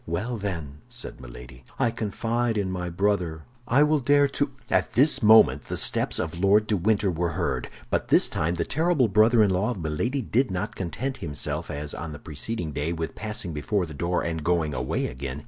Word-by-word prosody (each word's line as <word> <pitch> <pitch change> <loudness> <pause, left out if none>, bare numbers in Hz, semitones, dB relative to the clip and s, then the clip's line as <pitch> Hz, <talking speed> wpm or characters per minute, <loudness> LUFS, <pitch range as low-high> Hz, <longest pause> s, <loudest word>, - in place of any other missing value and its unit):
"Well, 105 +9 -2
then," 80 -8 -5
said - - -8
Milady, 60 +1 -11
"I 115 - +1
confide 115 +1 -1
in 95 -2 -1
my 90 -1 -3
brother; 90 -3 -1 0.2
I 135 +5 +4
will 150 0 +3
dare 145 +2 +4
to—" 145 +1 -1 0.2
At - - +1
this 135 +1 +5
moment 105 - +6
the - - -4
steps - - +2
of 80 +1 -3
Lord 100 +3 +4
de 105 - 0
Winter 100 +1 +1
were 85 0 -2
heard; - - -2 0.2
but - - 0
this - - +4
time 85 +3 -1
the 85 -1 -1
terrible 160 -4 +2
brother 110 +3 +5
in 100 - +2
law 95 +5 +1
of 120 - -3
Milady 100 - -2
did 125 +4 +1
not 105 +4 -3
content 130 +9 -4
himself, 75 -6 -3
as 75 0 -5
on 85 -2 -6
the - - -7
preceding 80 +4 -4
day, 75 +4 -2
with 80 -1 -4
passing 105 -5 -4
before 90 +6 -1
the 80 - -10
door 85 +5 -1
and 80 -2 -3
going 80 -2 +1
away 60 0 -2
again. 65 +2 -5
95 Hz, 200 wpm, -25 LUFS, 80-115 Hz, 0.2 s, moment